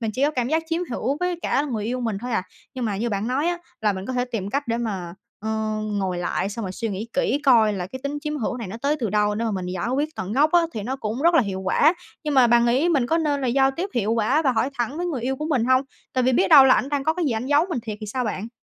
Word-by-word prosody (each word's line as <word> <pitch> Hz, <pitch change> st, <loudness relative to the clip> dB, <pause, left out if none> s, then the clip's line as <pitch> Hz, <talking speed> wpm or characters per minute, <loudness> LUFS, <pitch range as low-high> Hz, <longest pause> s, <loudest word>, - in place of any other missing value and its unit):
mình 225 Hz, -2 st, -1 dB
chỉ 260 Hz, -, -1 dB
có 295 Hz, -, +3 dB
cảm 250 Hz, -4 st, -1 dB
giác 320 Hz, +1 st, +1 dB
chiếm 330 Hz, +2 st, -1 dB
hữu 255 Hz, +3 st, -1 dB
với 360 Hz, -1 st, 0 dB
cả 280 Hz, -, +1 dB
là 295 Hz, -, -4 dB
người 215 Hz, -4 st, -2 dB
yêu 250 Hz, +3 st, -2 dB
mình 225 Hz, -5 st, -2 dB
thôi 245 Hz, +1 st, -4 dB
à. 205 Hz, -, +1 dB, 0.3 s
Nhưng 255 Hz, -, -3 dB
mà 210 Hz, -3 st, -1 dB
như 230 Hz, +4 st, -1 dB
bạn 200 Hz, +1 st, -2 dB
nói 270 Hz, +5 st, 0 dB
á 350 Hz, -, -1 dB, 0.2 s
là 210 Hz, -2 st, +2 dB
mình 190 Hz, 0 st, -6 dB
có 260 Hz, -, -3 dB
thể 250 Hz, 0 st, 0 dB
tìm 215 Hz, -6 st, -4 dB
cách 280 Hz, +1 st, -2 dB
để 230 Hz, -, +1 dB
mà, 190 Hz, -7 st, -4 dB, 0.3 s
ờ, 220 Hz, -, -4 dB, 0.4 s
ngồi 195 Hz, -4 st, -2 dB
lại, 180 Hz, +2 st, -1 dB
xong 220 Hz, +1 st, -5 dB
rồi 185 Hz, -, -4 dB
suy 225 Hz, +4 st, -3 dB
nghĩ 205 Hz, +3 st, -5 dB
kỹ 275 Hz, +1 st, +1 dB
coi 230 Hz, -6 st, +5 dB
là 180 Hz, -3 st, -3 dB
cái 260 Hz, +7 st, -8 dB
tính 285 Hz, +1 st, -3 dB
chiếm 300 Hz, 0 st, -3 dB
hữu 250 Hz, -1 st, -2 dB
này 230 Hz, -6 st, -6 dB
nó 220 Hz, -, -6 dB
tới 290 Hz, +2 st, +1 dB
từ 225 Hz, -5 st, -1 dB
đâu 210 Hz, 0 st, +2 dB
để 225 Hz, +2 st, -2 dB
mà 225 Hz, -, 0 dB
mình 185 Hz, -3 st, -3 dB
giải 180 Hz, +4 st, -3 dB
quyết 295 Hz, +2 st, 0 dB
tận 190 Hz, +2 st, -4 dB
gốc 295 Hz, +6 st, +3 dB
á 345 Hz, -, +6 dB
thì 215 Hz, -, -4 dB
nó 255 Hz, +6 st, -3 dB
cũng 230 Hz, +1 st, -4 dB
rất 340 Hz, +1 st, +4 dB
là 320 Hz, -, +6 dB
hiệu 190 Hz, -2 st, -4 dB
quả. 285 Hz, -, +3 dB, 0.3 s
Nhưng 300 Hz, -1 st, -1 dB
mà 260 Hz, -2 st, +6 dB
bạn 235 Hz, 0 st, +4 dB
nghĩ 260 Hz, +8 st, +2 dB
mình 280 Hz, -8 st, +2 dB
có 330 Hz, +5 st, +1 dB
nên 290 Hz, -3 st, 0 dB
là 260 Hz, -, -1 dB
giao 270 Hz, +2 st, +3 dB
tiếp 340 Hz, +8 st, -4 dB
hiệu 225 Hz, -2 st, +1 dB
quả 230 Hz, +8 st, +2 dB
và 265 Hz, -3 st, +2 dB
hỏi 235 Hz, +4 st, 0 dB
thẳng 240 Hz, +5 st, -1 dB
với 355 Hz, +1 st, -2 dB
người 295 Hz, -8 st, -2 dB
yêu 265 Hz, +2 st, -1 dB
của 305 Hz, -, -4 dB
mình 255 Hz, -6 st, +2 dB
hông? 255 Hz, +1 st, +4 dB, 0.3 s
Tại 255 Hz, -1 st, +1 dB
vì 260 Hz, -, +3 dB
biết 195 Hz, -5 st, +3 dB
đâu 270 Hz, +4 st, +9 dB
là 260 Hz, -, +6 dB
ảnh 270 Hz, -, 0 dB
đang 285 Hz, -1 st, -1 dB
có 315 Hz, -, +2 dB
cái 360 Hz, -, -1 dB
gì 280 Hz, -, +1 dB
ảnh 225 Hz, +3 st, -3 dB
giấu 290 Hz, +4 st, +4 dB
mình 250 Hz, -, -1 dB
thiệt 215 Hz, -2 st, -5 dB
thì 215 Hz, -, -6 dB
sao 250 Hz, +4 st, -2 dB
bạn? 215 Hz, -1 st, -3 dB
245 Hz, 325 wpm, -23 LUFS, 215-280 Hz, 0.4 s, đâu